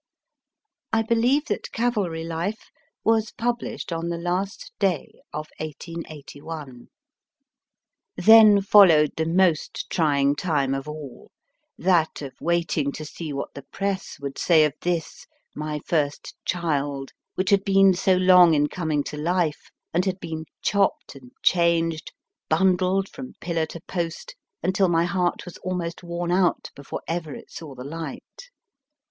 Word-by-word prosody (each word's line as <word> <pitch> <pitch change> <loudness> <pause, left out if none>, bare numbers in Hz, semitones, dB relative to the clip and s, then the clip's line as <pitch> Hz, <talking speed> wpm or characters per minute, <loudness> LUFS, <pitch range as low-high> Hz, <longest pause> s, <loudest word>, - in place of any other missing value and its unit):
I 225 0 +2
believe 240 +7 +2
that - - -3
Cavalry 210 -9 -1
Life 170 +6 -4 0.3
was 220 -1 +2
published 235 -6 -3
on 165 +1 -3
the 170 - -2
last 180 +3 -3
day 190 -7 -1
of 155 0 -5
1881. 155 -3 -8 1.3
Then 215 +1 +8
followed 175 -7 +6
the 160 0 -1
most 170 -2 +1
trying 145 -4 +2
time 145 -5 0
of 135 +1 -4
all 150 -5 -9 0.5
that 170 -4 +1
of 135 - -7
waiting 170 -4 0
to 155 - -7
see 155 0 -7
what 140 0 -5
the 140 - -8
Press 195 +6 -4
would 140 -1 -6
say 160 -3 +5
of 150 - -1
this, 175 -3 -3 0.3
my 150 0 -3
first 145 -4 -1
child, 145 -5 -1 0.2
which 185 0 0
had 200 -1 +4
been 195 -1 +5
so 185 +1 +2
long 180 -2 +6
in 145 0 +3
coming 155 -5 -1
to 150 - -6
life, 165 0 -1 0.2
and 175 +3 +2
had 190 -1 -1
been 160 -2 -5 0.2
chopped 200 -1 +1
and 130 -3 -14
changed, 165 -2 +2 0.4
bundled 185 +3 +2
from 255 +4 -9
pillar 165 -2 -1
to 170 - -8
post, 170 -2 -4 0.3
until 190 +1 +2
my 165 0 +3
heart 175 0 -1
was 180 - -9
almost 180 -2 -4
worn 175 0 -3
out 180 0 +1
before 140 - -7
ever 165 -3 -3
it - - -12
saw 150 -5 -9
the 125 - -8
light. 165 - -8
170 Hz, 140 wpm, -24 LUFS, 155-190 Hz, 1.3 s, Then